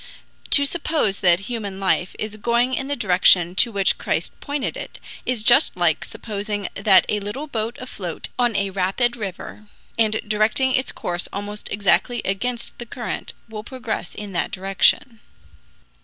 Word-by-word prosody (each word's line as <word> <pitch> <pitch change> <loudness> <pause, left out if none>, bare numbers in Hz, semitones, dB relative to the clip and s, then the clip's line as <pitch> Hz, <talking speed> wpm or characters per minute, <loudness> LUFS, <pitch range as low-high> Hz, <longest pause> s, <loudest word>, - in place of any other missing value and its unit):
To 285 - +6
suppose 295 - 0
that 175 0 +4
human 200 -3 -5
life 190 -1 0
is 215 0 -4
going 235 +4 +1
in 270 +1 -1
the 285 - -1
direction 180 -4 +4
to 235 +5 +3
which 195 -2 +1
Christ - - -1
pointed 285 -2 -3
it, - - -8 0.3
is 245 -4 0
just 240 - +5
like 170 -3 +2
supposing 205 -2 -4
that 195 -2 +5
a 210 - 0
little 210 +9 -5
boat 230 -4 -3
afloat 190 -9 -6
on 240 -3 +2
a 200 0 0
rabid 200 +6 +1
river, 210 -1 -7 0.3
and 220 -1 +3
directing 215 +5 +2
its 260 0 +1
course 175 0 -3
almost 205 +1 -5
exactly 205 +4 +2
against 235 +5 -2
the 240 - -7
current, 240 0 -5
will 215 -1 -7
progress 230 -6 -5
in 205 -1 -7
that 175 - 0
direction. 195 +5 +2
210 Hz, 155 wpm, -22 LUFS, 195-240 Hz, 0.3 s, To